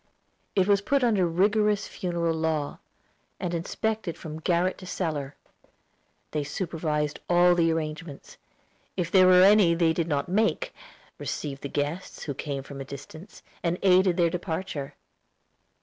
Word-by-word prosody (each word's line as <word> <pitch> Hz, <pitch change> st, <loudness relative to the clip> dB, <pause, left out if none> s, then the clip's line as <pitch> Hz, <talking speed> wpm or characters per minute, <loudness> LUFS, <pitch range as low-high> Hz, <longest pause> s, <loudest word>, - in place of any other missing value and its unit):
It 190 Hz, -1 st, +3 dB
was 200 Hz, -1 st, +4 dB
put 275 Hz, +6 st, +1 dB
under 210 Hz, -7 st, +3 dB
rigorous 210 Hz, +4 st, +2 dB
funeral 170 Hz, -3 st, -2 dB
law, 160 Hz, -2 st, -2 dB, 0.6 s
and 175 Hz, -, -3 dB
inspected 200 Hz, +2 st, -2 dB
from 155 Hz, -1 st, -7 dB
garret 175 Hz, +3 st, +1 dB
to 185 Hz, -, -10 dB
cellar. 150 Hz, -7 st, -3 dB, 1.0 s
They 150 Hz, -1 st, -1 dB
supervised 155 Hz, -2 st, -2 dB
all 175 Hz, 0 st, +5 dB
the 165 Hz, -1 st, +3 dB
arrangements, 155 Hz, -2 st, -5 dB, 0.6 s
if 175 Hz, -2 st, -1 dB
there 185 Hz, -1 st, +6 dB
were 180 Hz, 0 st, +7 dB
any 195 Hz, -4 st, +6 dB
that -, -, -5 dB
they 165 Hz, -1 st, +3 dB
did 165 Hz, 0 st, -1 dB
not 145 Hz, -3 st, -1 dB
make, 220 Hz, -, 0 dB, 0.5 s
received 140 Hz, -2 st, -4 dB
the 140 Hz, -, -5 dB
guests 150 Hz, +7 st, -3 dB
who 145 Hz, -, -3 dB
came 140 Hz, 0 st, -4 dB
from 135 Hz, 0 st, -8 dB
a -, -, -3 dB
distance, 145 Hz, +7 st, -11 dB, 0.2 s
and 170 Hz, 0 st, 0 dB
aided 185 Hz, -1 st, +4 dB
their 170 Hz, -2 st, +3 dB
departure. 160 Hz, -5 st, -4 dB
170 Hz, 150 wpm, -27 LUFS, 155-185 Hz, 1.0 s, were